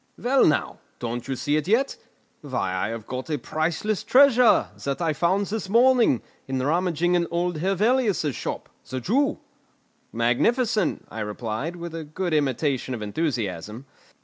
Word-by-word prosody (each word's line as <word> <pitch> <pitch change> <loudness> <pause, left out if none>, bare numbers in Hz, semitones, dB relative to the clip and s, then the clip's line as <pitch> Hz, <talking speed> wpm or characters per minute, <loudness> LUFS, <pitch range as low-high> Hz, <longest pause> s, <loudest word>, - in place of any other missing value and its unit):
"Well, 260 +2 +3
now; 155 - 0 0.2
don't 120 +1 -4
you 135 - -2
see 145 +4 0
it 155 +1 -2
yet? 245 +7 +2 0.5
Why 130 -10 -2
I 95 - -1
have 115 -1 -6
got 130 +5 -6
a 150 - 0
priceless 165 - -2
treasure, 250 -3 +5
that 140 +1 -2
I 165 -3 0
found 185 +7 +1
his 210 -2 -4
morning, 235 - +4 0.2
in 135 0 -2
rummaging 170 +5 +1
in 175 -1 +2
old 175 -1 -1
Hevelius's 195 - +1
shop, - - -5 0.2
the 130 - -3
Jew." 275 - +1 0.7
"Magnificent!" 200 - +1
I 110 - -6
replied, 110 +9 -4
with 170 -1 -7
a 165 -1 -5
good 170 +3 -3
imitation 135 -2 0
of 110 - -6
enthusiasm. 105 - -3
160 Hz, 150 wpm, -24 LUFS, 130-195 Hz, 0.7 s, treasure